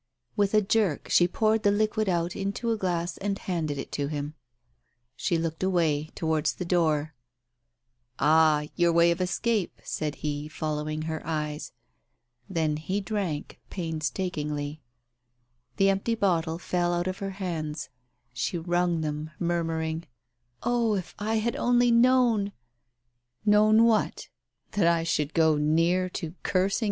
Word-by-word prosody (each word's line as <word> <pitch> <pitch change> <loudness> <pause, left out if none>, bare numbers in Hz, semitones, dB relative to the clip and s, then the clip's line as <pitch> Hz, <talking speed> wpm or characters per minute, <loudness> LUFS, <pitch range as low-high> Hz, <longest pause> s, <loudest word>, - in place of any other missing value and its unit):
With 205 0 +2
a 215 - +5
jerk, 195 -6 +1
she 175 - +5
poured 220 +3 +1
the 205 - +3
liquid 215 0 +1
out 175 0 0
into 200 +4 -2
a - - +2
glass 175 -3 -2
and 200 0 -1
handed 160 -7 -2
it - - -6
to 145 -1 -2
him. 145 0 -4 0.8
She 170 - 0
looked 165 -1 -3
away 160 -5 +1
— - - -35
towards 160 -2 0
the 180 - -4
door.... 155 -4 +1 0.5
" 120 0 -50
Ah, 155 -1 +4
your 175 -1 +3
way 170 +1 +5
of 170 +2 -1
escape! 205 +2 -1
" - - -29
said 150 -1 -3
he, 145 0 -2
following 155 +1 -3
her 160 0 -3
eyes. 150 -1 -3 0.8
Then 160 -4 0
he 185 +6 -2
drank, 195 -7 -3
painstakingly. 155 -3 -3 1.0
The 195 0 +5
empty 195 +4 0
bottle 170 -6 +1
fell 175 0 0
out 175 0 -1
of 185 +1 -3
her 195 -1 -5
hands. 160 -5 -4 0.4
She 125 +8 -2
wrung 175 0 0
them, 150 0 -3
murmuring 165 -1 -1 0.3
— 120 0 -28
"Oh, 235 -3 +2
if 185 -3 -4
I 215 +2 -1
had 220 +1 0
only 245 0 +3
known! 235 -4 +4
170 Hz, 130 wpm, -27 LUFS, 155-195 Hz, 1.0 s, a